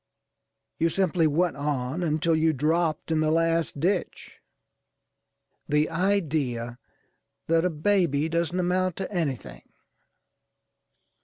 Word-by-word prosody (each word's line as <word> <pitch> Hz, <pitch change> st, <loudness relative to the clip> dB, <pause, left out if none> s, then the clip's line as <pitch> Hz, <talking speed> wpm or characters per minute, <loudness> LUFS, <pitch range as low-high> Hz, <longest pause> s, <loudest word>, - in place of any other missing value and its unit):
You 165 Hz, -, +3 dB
simply 180 Hz, -2 st, +1 dB
went 170 Hz, +4 st, +1 dB
on 140 Hz, +1 st, -2 dB
until 160 Hz, 0 st, +1 dB
you 160 Hz, 0 st, +2 dB
dropped 160 Hz, +3 st, 0 dB
in 160 Hz, -, +2 dB
the 155 Hz, 0 st, +2 dB
last 165 Hz, -1 st, +1 dB
ditch. 180 Hz, +4 st, -2 dB, 1.3 s
The 150 Hz, +1 st, +2 dB
idea 150 Hz, -10 st, -1 dB, 0.7 s
that 165 Hz, +1 st, +2 dB
a -, -, +3 dB
baby 160 Hz, -3 st, +1 dB
doesn't 170 Hz, +2 st, -1 dB
amount 180 Hz, 0 st, 0 dB
to 195 Hz, -, -5 dB
anything! 130 Hz, -, -3 dB
160 Hz, 105 wpm, -26 LUFS, 150-175 Hz, 1.3 s, You